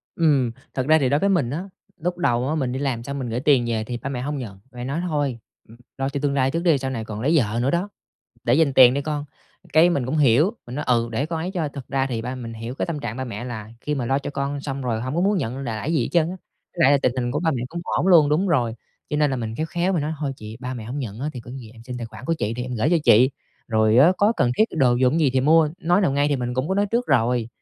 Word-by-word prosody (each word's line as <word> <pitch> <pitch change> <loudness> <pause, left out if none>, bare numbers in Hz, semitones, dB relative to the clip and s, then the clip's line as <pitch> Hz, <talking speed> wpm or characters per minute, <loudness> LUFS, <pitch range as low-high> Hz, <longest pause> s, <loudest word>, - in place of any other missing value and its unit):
Ừm, 145 -7 +2 0.2
thật 130 +1 -2
ra 155 - +6
thì 130 - +1
đối 145 +2 +2
với 200 - +2
mình 175 -11 +2
á, 155 +7 -3 0.3
lúc 175 +1 -3
đầu 125 -7 +1
á 155 - 0
mình 130 -5 -1
đi 130 - -3
làm 130 -5 -2
xong 140 +3 -5
mình 125 -3 -4
gửi 115 - -2
tiền 135 -3 +3
về 110 -2 -1
thì 120 +2 -5
ba 135 - -5
mẹ 125 -3 -3
hông 145 +2 -3
nhận, 105 -7 -7
ba - - -23
mẹ 120 - -5
nói: 140 +6 -2
"Thôi, 145 -6 -1 0.3
ừm, 115 - -15 0.2
lo 135 0 -1
cho 140 0 -3
tương 140 - +1
lai 135 -1 +2
trước 165 +3 -2
đi, 165 -5 +4
sau 135 0 -3
này 115 -4 -4
còn 110 -1 -6
lấy 145 +6 +1
vợ 115 -5 +1
nữa 135 - +1
đó, 175 +4 -1 0.6
để 120 - +3
dành 155 -2 +3
tiền 130 -1 +7
đi 140 - 0
con". 145 0 -3 0.5
Cái 160 +3 +6
mình 140 -7 0
cũng 140 - -1
hiểu, 145 - +4
mình 120 - -8
nói: 150 - -3
"Ừ, 120 -2 +2
để 135 +6 -1
con 165 0 -3
ấy 175 +3 -3
cho". 160 -4 -1
Thật 140 -3 -8
ra 135 0 0
thì 115 -4 -3
ba 125 +2 -4
mình 115 -3 -7
hiểu 115 +3 -6
cái - - -2
tâm 165 -3 -3
trạng 120 -3 -5
ba 130 - -3
mẹ 110 -1 -6
là 110 -3 -6
khi 150 - -2
mà 125 -4 -2
lo 135 +2 +2
cho 140 - -5
con 140 0 -3
xong 140 -1 -4
rồi 115 -3 -1
hông 130 +4 -4
có 170 - +1
muốn 200 +2 +2
nhận 130 -4 -3
l 135 - -5
lại 115 +6 -3
gì 155 - +2
hết - - -2
trơn 170 - +4
á. 185 - -6 0.4
Với 170 - +1
lại 140 - +6
là, 140 - +5
tình 125 - +2
hình 120 -1 -1
của 150 - -1
ba 165 -2 +1
mẹ 125 -5 -2
cũng 170 +1 -5
ổn 180 - -1
luôn, 165 -6 +6
đúng 170 +7 +1
rồi, 120 -8 +1 0.4
cho 150 - 0
nên 150 -1 +2
là 130 - -1
mình 115 -2 -4
khéo 155 - -2
khéo 175 +3 -1
mình 165 - 0
nói: 155 +2 -2
"Thôi 145 -3 -2
chị, 110 +1 -9
ba 130 +1 -4
mẹ 115 - -7
hổng 125 +6 -5
nhận 115 -4 -5
á 145 - -2
thì 125 - -7
có 120 - -12
gì 125 -4 -9
em 115 -1 -15
xin 125 +1 -7
tài 115 - -5
khoản 130 - -12
của 165 - +1
chị 110 -2 -1
thì 125 - -3
em 125 0 -5
gửi 120 +6 +1
cho 175 - +4
chị, 125 +5 +6 0.4
rồi 110 -1 +3
á 165 +7 +7
có 205 +3 +4
cần 125 - +2
thiết 220 - +5
đồ 130 -5 +4
dùng 130 +6 +2
gì 145 -4 +3
thì 130 - +2
mua." 155 +3 +4
Nói 175 +4 +3
nào 160 -9 +2
ngay 145 +1 +2
thì 145 - +1
mình 125 -1 -3
cũng 130 +6 -1
có 190 - 0
nói 205 +1 +2
trước 235 +4 -1
rồi, 120 -3 +2
135 Hz, 325 wpm, -23 LUFS, 120-155 Hz, 0.6 s, tiền